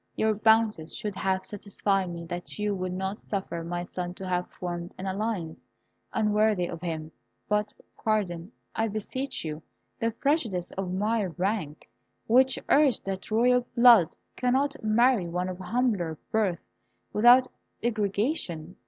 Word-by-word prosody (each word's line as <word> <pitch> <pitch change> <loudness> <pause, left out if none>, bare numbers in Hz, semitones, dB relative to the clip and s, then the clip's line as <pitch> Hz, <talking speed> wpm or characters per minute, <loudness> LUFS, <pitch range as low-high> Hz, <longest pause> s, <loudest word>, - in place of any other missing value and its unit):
"Your 220 0 +2
bounties 215 -6 +2
should 210 -4 -4
have 190 0 0
satisfied 200 -2 -1
me 170 -1 -6
that 175 +1 -5
you 210 0 0
would 185 -1 -3
not 190 +3 -3
suffer 190 -4 -4
my 175 +1 -3
son 180 0 -5
to 190 - -7
have 180 -1 -1
formed 175 -1 -6
an 190 - -6
alliance 190 -4 -3 0.4
unworthy 210 -3 +2
of 170 - -7
him. 160 -3 -4 0.4
But 210 0 +1 0.3
pardon, 195 -4 -1 0.2
I 225 - +1
beseech 220 +3 -4
you, 155 0 -4 0.4
the 230 - +1
prejudices 230 - 0
of 190 -1 -4
my 210 +3 +1
rank, 180 -3 -3 0.4
which 260 +3 +4
urged 280 -4 +4
that 190 -1 -4
royal 245 +2 +3
blood 235 -9 +7 0.2
could 250 -1 +1
not 280 +2 +1
marry 220 -2 +3
one 180 +2 -2
of 185 0 -6
humbler 190 -6 0
birth 200 -6 0 0.5
without 245 +4 +7 0.4
degradation. 205 - -1
200 Hz, 145 wpm, -27 LUFS, 180-225 Hz, 0.5 s, blood